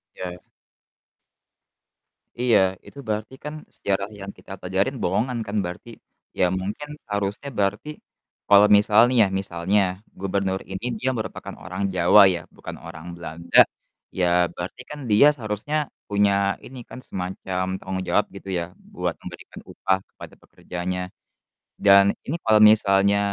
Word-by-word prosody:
Ya. 90 Hz, -1 st, -7 dB, 2.0 s
Iya, 125 Hz, -2 st, +4 dB, 0.3 s
itu -, -, -15 dB
berarti 110 Hz, +3 st, -3 dB
kan 150 Hz, 0 st, -5 dB, 0.2 s
sejarah 100 Hz, 0 st, -1 dB
yang 100 Hz, 0 st, -7 dB
kita -, -, -14 dB
pelajarin 95 Hz, +9 st, -1 dB
bohongan 115 Hz, +7 st, 0 dB
kan 100 Hz, -, -4 dB
berarti, 90 Hz, +6 st, -7 dB, 0.5 s
ya 90 Hz, -, +5 dB
mungkin 105 Hz, +10 st, -5 dB, 0.2 s
harusnya 100 Hz, +7 st, -2 dB
berarti 105 Hz, +8 st, 0 dB, 0.6 s
kalau 100 Hz, +1 st, +7 dB
misal 105 Hz, +1 st, +4 dB
nih 125 Hz, -1 st, 0 dB
ya, -, -, +2 dB
misalnya, 95 Hz, +2 st, 0 dB, 0.4 s
gubernur 95 Hz, 0 st, -1 dB
ini 95 Hz, +5 st, -5 dB
dia 130 Hz, -, 0 dB
merupakan 110 Hz, -, -6 dB
orang 95 Hz, +2 st, -5 dB
Jawa 90 Hz, +4 st, +6 dB
ya, 85 Hz, -, -5 dB
bukan -, -, -8 dB
orang 80 Hz, +2 st, -9 dB
Belanda, 85 Hz, 0 st, -3 dB, 0.6 s
ya 90 Hz, -, +2 dB, 0.3 s
berarti 90 Hz, +7 st, -6 dB
kan 150 Hz, -, -7 dB
dia 110 Hz, +8 st, +7 dB
seharusnya 110 Hz, +4 st, -4 dB, 0.3 s
punya 100 Hz, 0 st, +3 dB, 0.3 s
ini 130 Hz, 0 st, -10 dB
kan 130 Hz, -, -9 dB
semacam 95 Hz, 0 st, -3 dB
tanggung 95 Hz, 0 st, -4 dB
jawab 105 Hz, -, +3 dB
gitu 100 Hz, -, -11 dB
ya -, -, -2 dB, 0.3 s
buat -, -, -2 dB
memberikan -, -, -10 dB
upah 95 Hz, 0 st, 0 dB
kepada -, -, -12 dB
pekerjanya. 90 Hz, +1 st, -5 dB, 0.9 s
Dan 100 Hz, 0 st, +8 dB, 0.2 s
ini 150 Hz, -, -2 dB
kalau 110 Hz, -1 st, +5 dB
misalnya 100 Hz, -1 st, +3 dB
100 Hz, 135 wpm, -23 LUFS, 95-110 Hz, 2.0 s, Dan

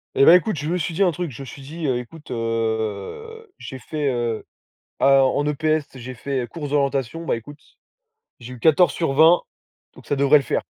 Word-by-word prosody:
Et 135 Hz, -, +5 dB
beh, 170 Hz, -, +9 dB
écoute, 180 Hz, 0 st, +1 dB
je 150 Hz, -, -4 dB
me 175 Hz, +3 st, 0 dB
suis 170 Hz, -1 st, -3 dB
dit 195 Hz, -, +2 dB
un 180 Hz, -, +3 dB
truc, 175 Hz, -1 st, -4 dB
je 130 Hz, -, -10 dB
me -, -, -7 dB
suis 140 Hz, -, -11 dB
dit: 155 Hz, +4 st, -7 dB
«Heu, 130 Hz, -2 st, +1 dB
écoute, 150 Hz, +6 st, -10 dB
heu» 115 Hz, -, -3 dB
j'ai 130 Hz, -, -8 dB
fait: 150 Hz, +2 st, -3 dB
«Heu, 120 Hz, -3 st, -2 dB, 0.5 s
alors 135 Hz, -1 st, +4 dB
en 145 Hz, -, 0 dB
EPS 155 Hz, +1 st, 0 dB
j'ai 130 Hz, 0 st, -8 dB
fait, 135 Hz, +2 st, -3 dB
heu, -, -, -6 dB
course 145 Hz, -2 st, -7 dB
d'orientation, 140 Hz, +1 st, -1 dB
bah, 120 Hz, -, 0 dB
écoute, 145 Hz, +6 st, -12 dB, 0.8 s
j'ai 125 Hz, +1 st, -9 dB
eu -, -, -12 dB
14/20 160 Hz, +2 st, +4 dB, 0.5 s
donc -, -, -16 dB
ça 145 Hz, -, -1 dB
devrait 140 Hz, +2 st, +5 dB
le 140 Hz, -, -5 dB
faire». -, -, -1 dB
140 Hz, 205 wpm, -22 LUFS, 125-160 Hz, 0.8 s, beh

